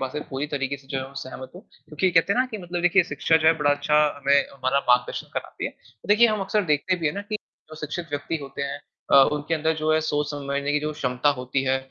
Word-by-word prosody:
बात 135 -1 -3
से 150 - -3
पूरी 135 +2 -3
तरीके 140 -1 -2
से 135 - -20
जो 135 0 -2
है 130 - -4
वो 140 - -18
सहमत 130 0 -9
हूँ 180 - -10 0.3
क्योंकि 180 +4 0
कहते 170 +4 +3
हैं - - -1
ना 255 - +3
कि 220 - -5
मतलब 175 -2 -4
देखिए 180 +2 +5
शिक्षा 155 +2 +2
जो 160 - +1
है 160 - +8
बड़ा 145 -1 +3
अच्छा 145 +1 +1 0.2
हमें 140 0 +2 0.2
हमारा 130 0 0
मार्गदर्शन 125 0 +2
कराती - - -5
है। - - -6 0.4
देखिए 220 +3 +6
हम 215 -2 0
अक्सर 200 +2 0
देखते 150 +5 +2
भी - - +2
हैं 150 - +1
ना 200 - -3
कि 215 - +1 0.3
जो - - -9
शिक्षित 155 +3 -4
व्यक्ति 145 +3 -2
होते 140 0 -6
हैं 140 0 -3 0.3
अ, - - +8 0.2
उनके 150 +2 -1
अंदर 160 +1 0
जो 155 0 +2
है 155 - +3
सोच 150 -1 -1
समझने 140 0 -2
की 150 - +1
जो 150 +1 -2
क्षमता 125 -1 0
होती 130 +1 -1
है, 130 0 +2
145 Hz, 260 wpm, -24 LUFS, 140-165 Hz, 0.4 s, है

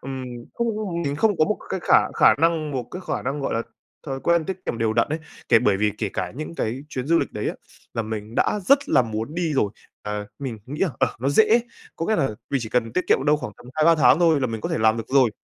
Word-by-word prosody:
Ừm. 130 -1 -5 0.6
Không 170 -5 -3
mình 145 -2 -2
không 210 -1 +2
có 155 - +5
một 215 - 0
cái 190 - -2
khả - - +3
khả - - +6
năng 160 -1 +1
một 130 -4 -3
cái 180 - -7
khả - - -2
năng, 140 +3 -2
gọi 135 - -2
là, 115 - 0 0.4
thói 135 -1 -4
quen 170 +1 +2
tiết 185 +2 -6
kiệm 115 - -2
đều 110 -1 +1
đặn 115 +1 +2
ấy. 155 +2 -2 0.3
Kể 115 - +7
bởi 105 -3 +2
vì 105 +1 +1
kể 105 - -1
cả 90 -1 -3
những 155 +2 -6
cái 120 +1 -2
chuyến 130 -2 -4
du 170 +1 +4
lịch - - -2
đấy - - -2
á - - -3 0.4
là 115 - 0
mình 110 +1 -6
đã 210 - +1
rất 275 +7 +4
là 130 - +5
muốn 115 +5 -4
đi 170 -3 -1
rồi. 105 -6 +2 0.3
Ờ, 105 0 -4
mình 130 -5 -5
nghĩ 145 +3 -6
là, 185 - +2
ờ, - - +1
nó 135 - +1
dễ, 220 +9 +5 0.4
có 165 - -3
nghĩa 220 - +2
là 135 - +2 0.2
mình 140 -2 +1
chỉ 110 - -5
cần 115 -1 0
tiết 180 - -1
kiệm 135 - +3
đâu 150 0 +4
khoảng 110 - -6
tầm - - -16
2-3 155 +2 +5
tháng 150 -1 +5
thôi 165 -4 +4
là 130 - +1
mình 115 -2 -4
có - - -3
thể - - -1
làm 110 0 +3
được 115 - -6
rồi. 130 -4 +4
135 Hz, 275 wpm, -23 LUFS, 115-165 Hz, 0.6 s, Kể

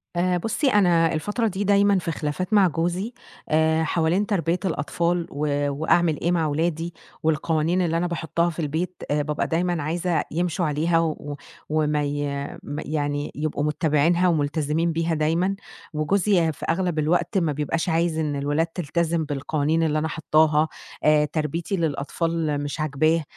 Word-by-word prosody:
آآ، 180 +1 +2
بُصّي، 225 - -1
أنا 175 -7 +4
الفترة 205 +9 -1
دي 200 0 -2
دايمًا 200 -1 +4
في 165 - -3
خلافات 160 +6 -3
مع 200 -3 +6
جوزي 175 - -2 0.4
آآ، 160 +1 +3
حوالين 165 +5 +1
تربية 180 -4 0
الأطفال 170 +1 -1
و 145 0 0
وأعمل 160 +2 +2
إيه 170 - +1
مع 170 -2 +1
ولادي، 165 +2 -1 0.3
والقوانين 160 +2 +1
اللي 165 -2 +1
أنا 175 +1 0
باحطّها 170 0 -1
في 170 - -7
البيت 165 +4 -3
آآ، 150 - +2
بابقى 150 0 -2
دايمًا 175 -1 0
عايزة 170 +2 0
يمشوا 175 +2 0
عليها 160 +3 +1
و 150 -3 -2 0.3
وما 150 -1 +1
ي 145 0 -2 0.4
ما 145 +2 -5
يعني 145 -1 -2
يبقوا 150 -1 -2
مُتّبعينها 155 +3 +2
ومُلتزمين 155 +1 +1
بيها 165 +1 0
دايمًا. 165 +5 +1 0.4
وجوزي 175 +2 +2
في 150 - -8
أغلب 175 -1 0
الوقت 170 +4 +1
ما 165 -5 +2
بيبقاش 150 +4 -1
عايز 165 0 +1
إن 150 -2 -1
الولاد 145 +4 0
تِلتزم 165 0 -1
بالقوانين 150 +2 0
اللي 155 -1 +1
أنا 155 - -1
حاطّاها 155 -1 +2 0.4
آآ، 150 0 +5
تربيتي 155 +5 -2
للأطفال 160 0 -1
مش 145 +2 -4
عاجباه 155 +2 +1
160 Hz, 155 wpm, -24 LUFS, 150-175 Hz, 0.4 s, مع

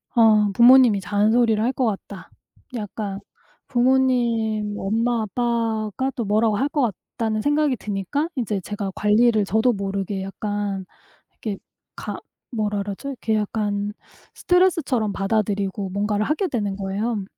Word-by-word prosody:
어 215 -3 +5
'부모님이 240 -2 +6
잔소리를 215 +3 +2
할 245 - +2
것 255 - 0
같다. 200 -2 -5 0.5
약간 210 -2 -4 0.5
부모님 240 -5 +1
엄마, 230 +4 0
아빠가 230 +2 -1
또 235 - -2
뭐라고 215 +1 +2
할 275 +5 0
것 290 - 0 0.4
같다.'는 220 -3 0
생각이 290 +1 +2
드니까 210 - -2
인제 215 -6 -2
제가 200 +1 -4
관리를 215 0 +3
저도 220 +5 +2
모르게 195 -1 -3
약간 200 -1 -3 0.5
이렇게 210 -3 -5 0.4
가 - - -5 0.3
뭐라 210 -3 -1
그러죠? 200 +7 -5
이렇게 230 -5 -2
약간 205 -1 -1 0.4
스트레스처럼 325 - +2
받아들이고 200 -1 -1
뭔가를 205 +2 0
하게 310 - 0
되는 210 - -2
거예요. 200 +2 -2
215 Hz, 300 characters per minute, -23 LUFS, 205-240 Hz, 0.5 s, 부모님이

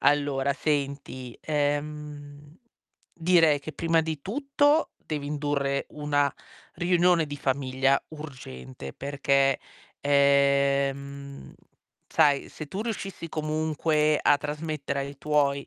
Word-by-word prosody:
Allora, 140 -1 +2
senti, 140 -4 -3
ehm, 145 0 -3 0.6
direi 165 -4 +4
che 155 +2 -7
prima 165 +2 +2
di 160 -2 -4
tutto 285 - +2
devi 145 -2 -5
indurre 145 -2 -1
una 145 -1 0 0.4
riunione 175 -1 +3
di 145 - -6
famiglia 135 0 +1
urgente, 70 - -9
perché, 140 -1 +1 0.4
ehm, 140 0 +2 0.5
sai, 145 -3 +3
se 155 - -8
tu 190 +8 -4
riuscissi 195 -6 -5
comunque 155 0 +1
a 145 - +5
trasmettere 150 -2 -3
ai 140 +1 -5
tuoi 140 -2 +1
145 Hz, 100 wpm, -27 LUFS, 140-155 Hz, 0.6 s, a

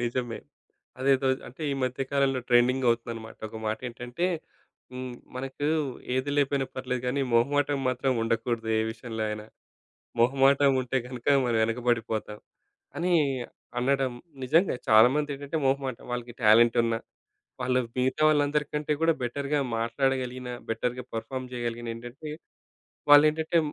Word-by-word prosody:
నిజమే. 120 0 -2 0.6
అదేదో 135 0 +3 0.2
అంటే 125 +6 -13
ఈ - - -1
మధ్య 130 +1 -1
కాలంలో 135 -2 +2
ట్రెండింగవుతుందనమాట. 120 -2 +1
ఒక 110 - -8
మాటేంటంటే 120 +7 -3 0.7
హ్మ్. 125 -1 -6 0.2
మనకు 135 +2 -4 0.5
ఏది 130 +2 0
లేపోయినా 140 -1 +1
పర్లేదు 125 -1 -3
గానీ 135 +3 0
మొహమాటం 145 +4 +2
మాత్రం 130 +1 +1
ఉండకూడదు 115 0 -1
ఏ - - +2
విషయంలో 110 -1 -6
అయినా. 105 0 -5 0.7
మొహమాటం 135 +3 +5
ఉంటే 130 +1 -1
గనక 125 -2 -9 0.2
మనం 115 -2 +1
ఎనకబడిపోతాం 115 -2 -1 0.6
అని 180 +1 +1 0.7
అనడం. 135 0 +1 0.3
నిజంగా 165 +7 +3
చాలామందేంటంటే 140 +6 +3
మొహమాటం. 135 -2 -1
వాళ్ళకి 120 -1 -4
టాలెంట్ 115 +2 +6
ఉన్న 115 -1 +1 0.7
వాళ్ళు 125 0 +2 0.2
మిగతా 130 +4 0
వాళ్ళందరి 150 0 +2
కంటే 150 0 0
గూడా 165 0 +4
బెటర్‌గా 140 +4 -1 0.2
మాట్లాడగలిగినా 125 +1 -1 0.2
బెటర్‌గా 125 +2 -2
పెర్ఫార్మ్ 130 +3 -4
జేయగలిగిన 120 -1 -4
ఏంటంటే, 120 +6 -9 0.8
వాళ్ళేంటంటే 155 +3 +6
125 Hz, 115 wpm, -27 LUFS, 120-140 Hz, 0.8 s, టాలెంట్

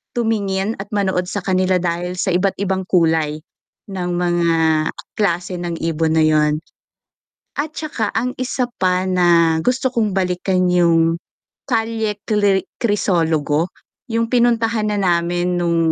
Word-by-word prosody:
tumingin 210 -3 0
at 200 - -9
manood 190 -3 0
sa 205 - -2
kanila 185 -1 +2
dahil 175 +1 -2
sa 185 - 0
iba't-ibang 190 0 0
kulay 160 -4 +2 0.5
ng 180 -2 -3
mga 175 -1 +1 0.7
klase 180 -3 0
ng 175 -1 -4
ibon 160 -1 0
na - - +4
yun. 150 -1 +2 1.0
At 305 +2 -2
tsaka, 245 -9 -3
ang 250 +1 -1
isa 255 -1 -2
pa 185 -1 +2
na 170 -3 +4
gusto 260 +1 +1
kong 220 -5 0
balikan 185 0 +1
yung 165 -2 +3 0.5
Calle 225 -2 0
Kliri 205 -3 +2 0.2
Crisologo, 165 - +1 0.4
yung 230 0 -1
pinuntahanan 225 -4 +1
na 175 -2 +3
namin 175 +1 -1
nung 170 -1 +1
185 Hz, 130 wpm, -19 LUFS, 170-215 Hz, 1.0 s, na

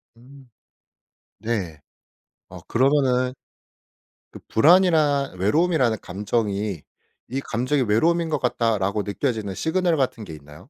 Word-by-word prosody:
음. 130 +2 -17 0.9
네. 100 -9 -3 0.7
어 - - -11
그러면은 130 -1 +1 1.0
그 - - -11
불안이나 155 -6 +4
외로움이라는 130 - +2
감정이 100 -2 -2 0.5
'이 135 +2 -2
감정이 130 +4 -1
외로움인 165 +10 +1
것 150 - -1
같다.'라고 110 -5 0
느껴지는 105 -1 -3
시그널 170 - 0
같은 125 -5 -2
게 80 -5 -9
있나요? 75 0 -14
125 Hz, 265 characters per minute, -23 LUFS, 105-145 Hz, 1.0 s, 불안이나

